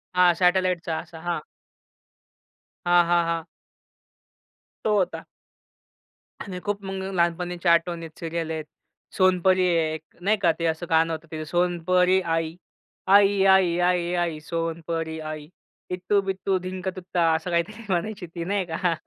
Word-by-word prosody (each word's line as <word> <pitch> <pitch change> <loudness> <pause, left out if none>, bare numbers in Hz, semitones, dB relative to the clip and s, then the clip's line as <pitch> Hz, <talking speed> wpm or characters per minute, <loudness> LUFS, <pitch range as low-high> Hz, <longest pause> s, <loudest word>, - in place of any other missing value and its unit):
हां, 180 -1 +6
सॅटेलाइटचा 180 -2 +1
असा 165 - -10
हां. 170 -3 -1 1.5
हां, 175 0 +5
हां, 170 0 +3
हां. 165 -1 -2 1.4
तो 215 -1 +2
होता. 185 -2 -1 1.2
आणि 185 -3 -6
खूप 205 -1 -3
मग 190 0 -4
लहानपणीच्या 175 0 +1
आठवणीत 170 -1 0
सीरियल 165 -1 -3
आहेत. 160 -1 -4 0.5
सोनपरी 185 0 +4
आहे 165 -2 +1
एक, 155 - -5 0.2
नाही 210 +4 +2
का 175 -3 +5
ते 170 - -1
असं 160 +1 -1
गाणं 165 0 +3
होतं 160 +1 -7
ते 155 -1 -4
सोनपरी 180 +2 +2
आई, 165 -2 -1 0.5
आई, 200 0 +5
आई, 190 -3 +5
आई, 175 -1 +1
आई 170 -3 -1
सोनपरी 165 0 -3
आई 155 -1 -6 0.4
इत्तू 185 +3 +1
बित्तू 195 0 -1
धिंक 185 +1 -5
तुत्ता 175 -2 0
असं 160 +2 -3
काही 170 0 +3
तरी 215 +2 -11
म्हणायची 190 +2 -2
ती, 170 +1 -6
नाही 195 0 0
का? 170 +1 0
175 Hz, 140 wpm, -25 LUFS, 165-185 Hz, 1.5 s, हां